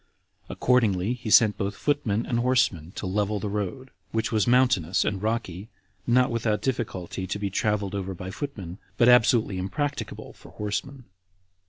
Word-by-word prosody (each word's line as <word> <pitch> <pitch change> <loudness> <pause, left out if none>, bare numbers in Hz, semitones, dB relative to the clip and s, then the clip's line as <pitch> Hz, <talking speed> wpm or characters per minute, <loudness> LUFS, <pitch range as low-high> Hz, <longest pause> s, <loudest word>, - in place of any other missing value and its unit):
Accordingly, 110 -4 +2
he 120 -3 -6
sent 105 -1 +5
both 100 +1 -2
foot 145 0 0
men 105 +3 0
and 120 -2 -1
horsemen 120 -10 +1
to - - -5
level 105 +2 -1
the 105 - -3
road, 105 +6 -4 0.2
which 110 0 -1
was 110 -1 +1
mountainous 120 -9 +3
and 100 -2 -2
rocky, 110 -3 -3 0.4
not 125 +1 +3
without 110 -2 -1
difficulty 100 -8 -3
to 100 - -3
be 100 -1 -3
traveled 105 -1 -1
over 95 -1 -4
by 90 +2 -7
footmen, 100 -9 -6 0.2
but 120 - +4
absolutely 115 -5 +4
impracticable 145 +10 -4
for - - -16
horsemen. 105 +6 -4
105 Hz, 160 wpm, -26 LUFS, 95-125 Hz, 0.4 s, sent